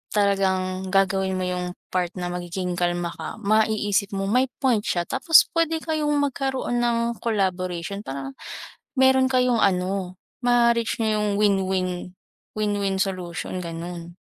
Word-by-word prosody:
talagang 190 Hz, -2 st, +1 dB
gagawin 190 Hz, 0 st, +1 dB
mo 185 Hz, -, -2 dB
'yung 180 Hz, 0 st, -3 dB, 0.2 s
part 180 Hz, -1 st, +1 dB
na 180 Hz, -1 st, -3 dB
magiging 180 Hz, 0 st, -3 dB
kalma 175 Hz, -1 st, 0 dB
ka, 160 Hz, -, -7 dB
maiisip 210 Hz, -1 st, +1 dB
mo 195 Hz, -, -1 dB
may 250 Hz, +7 st, +2 dB, 0.2 s
point 250 Hz, -5 st, +4 dB
siya. 175 Hz, -6 st, 0 dB
Tapos 325 Hz, -, +5 dB
pwede 325 Hz, -1 st, 0 dB
kayong 305 Hz, -2 st, 0 dB
magkaroon 270 Hz, -3 st, -1 dB
ng 235 Hz, -1 st, 0 dB
collaboration 185 Hz, -4 st, -1 dB
parang 135 Hz, -8 st, -6 dB, 0.6 s
meron 265 Hz, -1 st, +5 dB
kayong 250 Hz, -2 st, +2 dB
ano, 185 Hz, -1 st, 0 dB, 0.3 s
ma-reach 235 Hz, -2 st, +2 dB
n'yo 215 Hz, -1 st, +1 dB
yung 210 Hz, 0 st, 0 dB
win-win 190 Hz, -3 st, 0 dB, 0.4 s
win-win 205 Hz, -2 st, 0 dB
solution, 185 Hz, -2 st, -4 dB
ganun. 170 Hz, 0 st, -6 dB
195 Hz, 130 wpm, -24 LUFS, 180-235 Hz, 0.6 s, Tapos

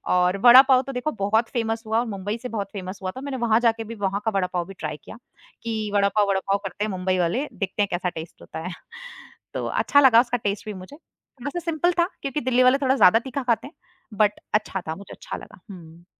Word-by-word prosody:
और 180 Hz, +1 st, +2 dB
वड़ापाव 255 Hz, +1 st, +8 dB
तो 275 Hz, -, -5 dB
देखो 250 Hz, +5 st, -2 dB
बहुत 220 Hz, +3 st, +2 dB
फ़ेमस 225 Hz, -1 st, -1 dB
हुआ 220 Hz, +1 st, +2 dB
और 240 Hz, -, -1 dB
मुंबई 205 Hz, +1 st, -4 dB
से 250 Hz, -, -4 dB
बहुत 200 Hz, -4 st, -4 dB
फ़ेमस 190 Hz, -1 st, -6 dB
हुआ 185 Hz, -, -2 dB
था, 260 Hz, -, -6 dB
मैंने 280 Hz, -2 st, -4 dB
वहाँ 230 Hz, -2 st, +2 dB
जाके 230 Hz, -1 st, +1 dB
भी 225 Hz, +1 st, -8 dB
वहाँ 195 Hz, +2 st, -1 dB
का 220 Hz, -, +1 dB
वड़ापाव 180 Hz, -2 st, -1 dB
भी 195 Hz, -, -9 dB
ट्राई 155 Hz, -1 st, -4 dB
किया, -, -, -11 dB, 0.5 s
कि 220 Hz, -2 st, -3 dB
वड़ापाव-वड़ापाव 200 Hz, -1 st, +2 dB
करते 205 Hz, -, -4 dB
हैं 215 Hz, -, -3 dB
मुंबई 185 Hz, 0 st, -1 dB
वाले, 205 Hz, -, 0 dB
देखते 195 Hz, +1 st, -3 dB
हैं -, -, 0 dB
कैसा 180 Hz, +1 st, -1 dB
टेस्ट 160 Hz, -1 st, -9 dB
होता -, -, -8 dB
है। -, -, -5 dB, 0.8 s
तो -, -, -3 dB
अच्छा 285 Hz, -, +3 dB
लगा 255 Hz, -4 st, +7 dB
उसका 245 Hz, 0 st, -2 dB
टेस्ट 200 Hz, 0 st, -2 dB
भी 215 Hz, -, -5 dB
मुझे, 185 Hz, +8 st, -11 dB, 0.5 s
वैसे 290 Hz, +6 st, -3 dB
सिंपल 335 Hz, +1 st, 0 dB
था 345 Hz, -, +4 dB
क्योंकि 275 Hz, +2 st, -3 dB
दिल्ली 255 Hz, 0 st, +3 dB
वाले 255 Hz, +2 st, +5 dB
थोड़ा 265 Hz, 0 st, +3 dB
ज़्यादा 220 Hz, -2 st, +6 dB
तीखा 265 Hz, +2 st, -5 dB
खाते 240 Hz, +1 st, 0 dB
हैं, 290 Hz, -, -15 dB, 0.4 s
बट 210 Hz, 0 st, +2 dB
अच्छा 210 Hz, -2 st, 0 dB
था, 160 Hz, -, -3 dB
मुझे 200 Hz, +2 st, -11 dB
अच्छा -, -, -7 dB
लगा, -, -, -13 dB
हुँ। 170 Hz, -2 st, -13 dB
215 Hz, 225 wpm, -24 LUFS, 190-250 Hz, 0.8 s, वड़ापाव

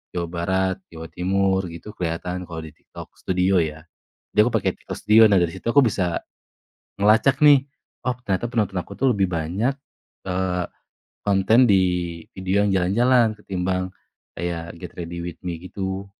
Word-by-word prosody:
Jawa 85 Hz, -1 st, -1 dB
Barat, 95 Hz, +2 st, 0 dB, 0.2 s
Jawa 80 Hz, 0 st, -8 dB
Timur 95 Hz, +1 st, +1 dB
gitu 85 Hz, +5 st, -9 dB
kelihatan 90 Hz, +1 st, -3 dB
kalau 80 Hz, -2 st, -6 dB
di 80 Hz, -, -9 dB
TikTok 75 Hz, -, -13 dB
studio 90 Hz, 0 st, +2 dB
ya, 80 Hz, -1 st, -2 dB, 0.5 s
jadi 105 Hz, -, -1 dB
aku -, -, -1 dB
pake 105 Hz, -, +2 dB
TikTok -, -, -7 dB
studio, 110 Hz, +1 st, +6 dB
nah 100 Hz, -, +3 dB
dari 85 Hz, -1 st, +1 dB
situ 95 Hz, -, -8 dB
aku 140 Hz, +2 st, +6 dB
bisa, 95 Hz, -7 st, 0 dB, 0.8 s
ngelacak 110 Hz, +7 st, +4 dB
nih, 145 Hz, -3 st, +7 dB, 0.4 s
oh 125 Hz, -1 st, 0 dB
ternyata 100 Hz, +4 st, 0 dB
penonton 100 Hz, -5 st, 0 dB
aku 100 Hz, -, -10 dB
tuh 130 Hz, -1 st, +3 dB
lebih 95 Hz, -2 st, +2 dB
banyak, 90 Hz, -, 0 dB, 0.6 s
eee, 90 Hz, -1 st, -1 dB, 0.6 s
konten 105 Hz, +5 st, +4 dB
di 95 Hz, -2 st, +5 dB, 0.5 s
video 95 Hz, +2 st, +1 dB
yang -, -, +1 dB
jalan-jalan 115 Hz, +5 st, +3 dB
ketimbang, 95 Hz, -2 st, -2 dB, 0.5 s
kayak 85 Hz, 0 st, -4 dB
get 90 Hz, 0 st, -9 dB
ready 85 Hz, 0 st, -5 dB
with 85 Hz, -1 st, -7 dB
me 85 Hz, -2 st, -3 dB
gitu. 95 Hz, +1 st, -4 dB
95 Hz, 160 wpm, -23 LUFS, 85-105 Hz, 0.8 s, nih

